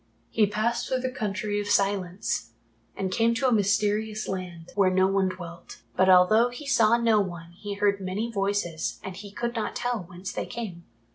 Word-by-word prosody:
He 215 -2 +3
passed 235 +4 -1
through 260 -1 0
the 255 0 -2
Country 205 -2 -2
of 205 - -6
Silence, 195 - 0 0.4
and 190 -1 -2
came 230 +4 +2
to 260 +3 +1
a - - +3
mysterious 210 +1 +1
land 180 -3 -6
where 195 -2 +4
no 185 0 +3
one 195 0 +2
dwelt. 175 -2 -9
But 185 0 +4
although 215 +6 +6
he 245 +5 -9
saw 235 -4 +4
no 230 -2 +3
one 175 -3 -6
he 200 +3 -6
heard 200 -1 +1
many 200 +5 -2
voices 195 -6 -1
and 190 -1 -6
he 205 +2 -9
could 235 +3 -3
not 225 -3 -3
tell 245 -2 -1
whence 180 +1 -7
they - - -4
came. 185 -8 -6
205 Hz, 190 wpm, -27 LUFS, 185-225 Hz, 0.4 s, although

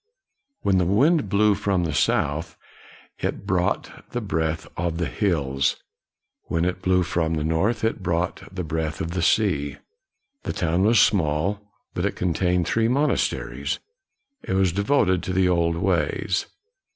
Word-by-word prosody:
When 95 -2 +3
the 90 - +2
wind 135 - +3
blew 105 +1 +4
from 100 -3 0
the 80 -3 -2
south, - - 0 0.6
it - - -3
brought 90 -1 -1
the 120 - -3
breath 80 -7 -2
of 85 -1 -2
the 85 - 0
hills; 70 -11 0 0.7
when 85 +1 0
it 90 0 -2
blew 90 0 +3
from 80 -1 -1
the 75 - -1
north, 95 +9 0
it 110 -1 0
brought 85 0 -1
the 95 -1 -4
breath 80 -1 -3
of 80 - -3
the 90 0 -2
sea. 80 -6 +1 0.6
The - - -4
town 85 +1 0
was 115 +1 +5
small, 100 +3 +1 0.2
but - - 0
it - - -4
contained 90 0 0
three 115 0 +2
monasteries. 140 +5 0 0.6
It - - -4
was 95 -2 +2
devoted 100 -3 +2
to 95 - -4
the 95 0 +3
old 85 -2 +2
ways. 90 +1 0
90 Hz, 150 wpm, -24 LUFS, 80-100 Hz, 0.7 s, was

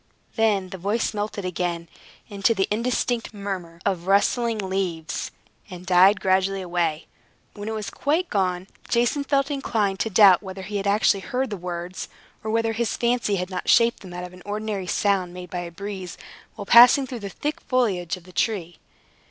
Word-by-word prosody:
Then 210 -5 +1
the 190 - -8
voice 205 +7 -1
melted 205 -1 -3
again 175 -1 -2 0.4
into 200 +3 +1
the 195 - +1
indistinct 235 0 -1
murmur 185 -4 -5
of 190 -4 0
the 175 - -14
rustling 225 +4 +2
leaves, 185 -5 -3 0.4
and 180 -1 -9
died 190 +2 +5
gradually 190 +1 +1
away. 170 -3 -1 0.5
When 205 +1 -6
it 220 - -3
was 210 -2 -5
quite 320 +6 0
gone, 185 - -1 0.2
Jason 240 +4 +1
felt 280 0 +1
inclined 220 -8 -1
to 225 - 0
doubt 195 -3 +7
whether 190 -1 -8
he 205 +1 -4
had 200 0 -2
actually 200 0 +3
heard 250 +4 -2
the - - -2
words, 180 0 -6 0.3
or 220 - -4
whether 225 0 +1
his 230 0 -1
fancy 235 -3 +1
had 180 0 -3
not 180 - -4
shaped 235 0 +4
them 185 - -11
out 180 - -5
of 180 - -8
the 180 0 -14
ordinary 205 -1 -4
sound 185 -2 0
made 180 -1 -9
by 180 - -3
a 175 -1 -6
breeze, 190 0 -7 0.4
while 205 - -7
passing 245 +5 +8
through 250 -2 -6
the 200 -2 -6
thick 300 - -4
foliage 195 -8 0
of 180 - -15
the 185 - -15
tree. 175 -7 -1
200 Hz, 185 wpm, -24 LUFS, 180-225 Hz, 0.5 s, passing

